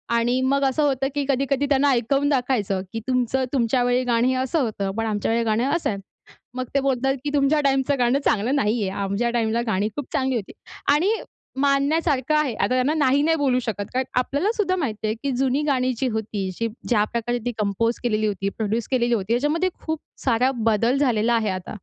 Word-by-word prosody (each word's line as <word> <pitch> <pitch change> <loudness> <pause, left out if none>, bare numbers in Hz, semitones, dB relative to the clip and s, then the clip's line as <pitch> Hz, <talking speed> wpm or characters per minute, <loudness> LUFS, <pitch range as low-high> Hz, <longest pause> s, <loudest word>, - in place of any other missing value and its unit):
आणि 240 +2 +2
मग 275 +2 +1
असं 270 +3 +1
होतं, 270 -2 +1
की 285 - 0
कधी-कधी 275 +1 +1
त्यांना 280 0 +3
ऐकवून 275 +4 +1
दाखवायचं, 245 -8 0
की 225 - -2
तुमचं 255 +1 +1
तुमच्या 245 0 +2
वेळी 245 +1 +2
गाणं 245 +2 +2
असं 290 +4 0
होतं 200 -4 -2
पण 225 - 0
आमच्या 210 0 -1
वेळेला 230 -1 +1
गाणं 235 +5 +1
असं 340 - -1
आहे. 200 -2 -3 0.6
मग 255 0 -2
ते - - +5
बोलतात, 270 0 +1
की 295 - -1
"तुमच्या 290 +1 +3
टाईमचं 275 0 +1
गाणं 245 +3 +3
चांगलं 230 +7 +1
नाहीये. 210 -5 +1
आमच्या 200 +4 -1
टाईमला 230 0 0
गाणी 205 0 +1
खूप 290 -3 -4
चांगली 260 -1 0
होती." 210 -4 -4 0.4
आणि 355 +8 +2 0.5
मानण्यासारखं 285 0 +2
आहे. 285 -6 +1
आता 200 - 0
त्यांना 255 +4 +2
नाही-नाही 295 +2 +2
बोलू 260 -3 +2
शकत 220 -4 -3
कारण 260 0 0
आपल्याला 290 - 0
सुद्धा 370 -3 +1
माहिती 220 - -2
आहे, 215 - -1
की 280 - 0
जुनी 270 +2 +1
गाणी 255 -2 +1
जी 260 - 0
होती 210 -3 -3
जी 230 - 0 0.2
ज्या 210 -4 +3
प्रकारे 240 +1 -1
ती 245 - 0
कंपोज 215 +3 0
केलेली 215 -2 +1
होती, 195 -1 -2
प्रोड्यूस 220 +1 -1
केलेली 240 -2 +2
होती 215 +1 0
याच्यामध्ये 305 +8 +1 0.2
खूप 315 -1 -2 0.3
सारा 255 +1 +3 0.2
बदल 230 +5 +2
झालेला 240 -4 +2
आहे 220 -3 +1
आता. 185 +2 -5
250 Hz, 200 wpm, -23 LUFS, 225-275 Hz, 0.6 s, ते